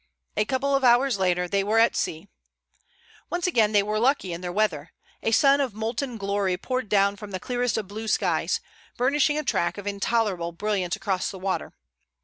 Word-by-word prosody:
A 210 - +1
couple 270 +4 0
of 270 - 0
hours 245 -2 +4
later 180 -1 +1
they 195 +2 +1
were 215 +3 +1
at 230 +1 +4
sea. 160 +4 -3 1.0
Once 350 0 -2
again 225 - +3
they 205 -1 +4
were 210 +1 -1
lucky 245 -7 +1
in 170 - -6
their 180 -1 -4
weather. 175 -7 -1 0.3
A - - 0
sun 275 +5 +4
of 255 -7 -2
molten 230 +3 -3
glory 200 -2 -1
poured 255 +3 -3
down 200 -1 +3
from 210 0 -9
the 190 -2 -4
clearest 245 +2 -1
of 215 -3 -3
blue 215 +3 -6
skies, - - +1 0.4
burnishing 290 +4 +2
a 305 - -1
track 175 -9 0
of 205 - -7
intolerable 200 -4 -1
brilliance 190 -1 -1
across 195 -2 -2
the 195 - -8
water. 190 0 -3
210 Hz, 190 wpm, -25 LUFS, 195-245 Hz, 1.0 s, hours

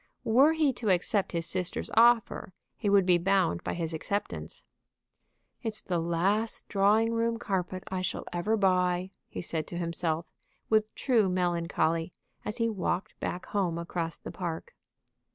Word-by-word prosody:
Were 265 +8 +5
he 310 -4 +2
to 230 -3 -2
accept 190 +2 +2
his 170 -1 -1
sister's 180 0 -3
offer 230 -5 +4 0.2
he 210 - -1
would 200 -2 +5
be 180 -1 +4
bound 185 - +2
by - - -2
his 165 -1 -2
acceptance. 200 +6 -4 1.0
"It's 220 -3 -1
the 175 -2 -1
last 185 +7 0
drawing 215 +3 +3
room 230 0 +1
carpet 185 -4 -2
I 185 -1 -1
shall 185 - -2
ever 210 +6 +1
buy," 185 -1 +2 0.2
he - - -6
said 160 -2 -2
to 175 - -6
himself, 170 -1 -1 0.5
with 215 0 +2
true 230 -7 +2
melancholy, 170 -2 0 0.3
as 210 - -4
he 230 -1 +2
walked 195 -3 -2
back 180 - -3
home 185 -5 -1
across 170 -1 -3
the - - -8
park. 170 -3 -5
185 Hz, 155 wpm, -29 LUFS, 170-215 Hz, 1.0 s, Were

